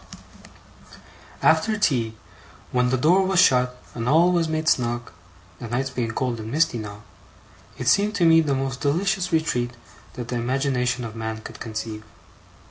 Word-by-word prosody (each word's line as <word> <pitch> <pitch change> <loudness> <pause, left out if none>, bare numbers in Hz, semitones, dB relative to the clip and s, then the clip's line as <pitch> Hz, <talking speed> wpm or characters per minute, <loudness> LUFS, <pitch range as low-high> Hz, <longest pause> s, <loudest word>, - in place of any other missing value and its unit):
After 220 -1 +3
tea, 120 - 0 0.6
when 125 0 +2
the 130 - +1
door 170 +9 +4
was 190 -1 +2
shut 125 -7 +4 0.2
and 120 0 -3
all 170 +5 +5
was 170 -2 +1
made 155 0 -2
snug 120 -4 0 0.5
(the 120 - -6
nights 130 +4 -2
being 120 -3 -2
cold 120 0 -2
and 110 0 -6
misty 140 -3 +1
now), 105 0 -8 0.7
it - - -5
seemed 205 +1 +3
to 180 -4 +2
me 165 0 +6
the 145 -3 0
most 135 -1 -3
delicious 180 +5 0
retreat 125 -7 0 0.4
that 120 -1 -7
the 125 - -2
imagination 125 0 0
of 110 -1 -8
man 110 -1 -4
could - - -10
conceive. 110 -1 -5
125 Hz, 160 wpm, -23 LUFS, 120-160 Hz, 0.7 s, me